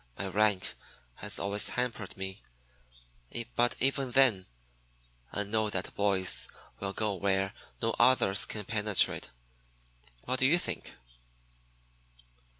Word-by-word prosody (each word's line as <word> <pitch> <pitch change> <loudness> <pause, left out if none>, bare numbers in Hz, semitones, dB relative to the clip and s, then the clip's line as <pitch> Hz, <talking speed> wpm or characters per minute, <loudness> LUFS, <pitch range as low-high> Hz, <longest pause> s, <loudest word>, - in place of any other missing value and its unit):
My 100 - -4
rank 105 -1 +1 0.4
has 105 0 +1
always 100 +1 +3
hampered 115 -6 -3
me, 95 +2 -6 1.1
but 120 0 +2
even 135 0 0
then 120 -7 +4 0.8
I 105 - -1
know 110 +1 -1
that 95 -2 -2
boys 100 -2 +2 0.3
will 100 0 -4
go 105 0 -2
where 95 +1 -1 0.3
no 115 0 0
others 100 -6 +4
can 105 -2 -4
penetrate. 105 -3 +2 1.0
What 130 0 0
do 130 - +5
you 165 +5 +4
think?" 175 - -5
105 Hz, 115 wpm, -29 LUFS, 95-120 Hz, 1.1 s, do